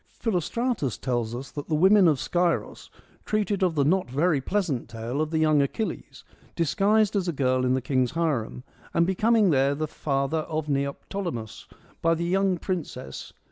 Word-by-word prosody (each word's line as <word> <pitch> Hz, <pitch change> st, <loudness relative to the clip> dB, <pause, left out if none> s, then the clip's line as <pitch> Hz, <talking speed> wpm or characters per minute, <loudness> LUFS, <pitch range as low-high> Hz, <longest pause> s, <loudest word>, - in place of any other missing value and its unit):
Philostratus 225 Hz, -, -1 dB
tells 120 Hz, -3 st, -2 dB
us 130 Hz, +2 st, -7 dB
that 145 Hz, -1 st, -6 dB
the 155 Hz, -, 0 dB
Women 190 Hz, +4 st, +6 dB
of 155 Hz, -4 st, +3 dB
Scyros 175 Hz, +8 st, -1 dB, 0.3 s
treated 210 Hz, -2 st, -1 dB
of 180 Hz, -3 st, +2 dB
the 140 Hz, -2 st, +2 dB
not 180 Hz, 0 st, +1 dB
very 145 Hz, +2 st, +1 dB
pleasant 170 Hz, -, -1 dB
tale 115 Hz, +5 st, -3 dB
of 155 Hz, -, -1 dB
the 160 Hz, -, -1 dB
young 155 Hz, -2 st, +4 dB
Achilles, 175 Hz, +10 st, -4 dB, 0.3 s
disguised 205 Hz, +6 st, +2 dB
as 190 Hz, -3 st, 0 dB
a -, -, +1 dB
girl 130 Hz, -3 st, +1 dB
in 130 Hz, 0 st, +2 dB
the 130 Hz, -, -2 dB
king's 130 Hz, 0 st, 0 dB
harem, 145 Hz, -8 st, -1 dB, 0.3 s
and 170 Hz, -, +4 dB
becoming 210 Hz, +2 st, +3 dB
there 140 Hz, 0 st, +2 dB
the 155 Hz, +2 st, -2 dB
father 140 Hz, +1 st, -1 dB
of 155 Hz, -1 st, -3 dB
Neoptolemus, 140 Hz, -, -4 dB, 0.3 s
by 165 Hz, 0 st, +3 dB
the 170 Hz, +1 st, -2 dB
young 190 Hz, +1 st, +1 dB
princess 165 Hz, -8 st, -5 dB
155 Hz, 170 wpm, -26 LUFS, 135-185 Hz, 0.3 s, Women